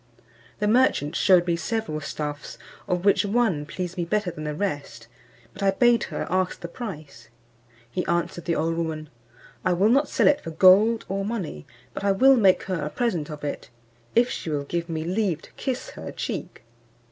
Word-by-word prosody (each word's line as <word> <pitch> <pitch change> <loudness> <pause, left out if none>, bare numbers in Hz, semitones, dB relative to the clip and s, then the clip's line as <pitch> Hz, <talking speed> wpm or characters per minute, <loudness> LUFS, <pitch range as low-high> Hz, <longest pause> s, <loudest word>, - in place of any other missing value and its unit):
The 210 - 0
merchant 210 - +2
shewed 180 -2 +5
me 170 -1 +1
several 205 -4 -3
stuffs, 145 -1 -5 0.3
of 180 -1 -1
which 200 - +4
one 200 -8 +1
pleased 180 +2 -5
me 175 - 0
better 190 +2 -1
than 155 -2 -7
the 150 0 -3
rest; 145 -10 -4 0.5
but 195 - -11
I 195 - +3
bade 235 +4 +3
her - - -4
ask 185 0 0
the 170 - -6
price. 155 - -8 0.6
He 180 - -1
answered 170 0 -1
the 170 - 0
old 165 +1 0
woman, 160 -2 -3 0.5
"I 185 - +2
will 195 +5 +3
not 280 +4 +3
sell - - +3
it 290 - +4
for 165 - -6
gold 195 +7 +5
or 195 +1 -2
money, 195 - -4 0.3
but - - -6
I 200 -1 +3
will 265 +7 +6
make 195 -6 +4
her 185 -5 -3
a 150 - -2
present 180 -8 -1
of 150 -1 -8
it, 145 - -5 0.5
if 240 +1 +5
she 170 - -5
will 145 -2 -1
give 170 +4 -3
me 160 -1 -2
leave 180 -2 -1
to - - -16
kiss 260 -2 -4
her - - -8
cheek." - - -5
180 Hz, 195 wpm, -25 LUFS, 155-210 Hz, 0.6 s, will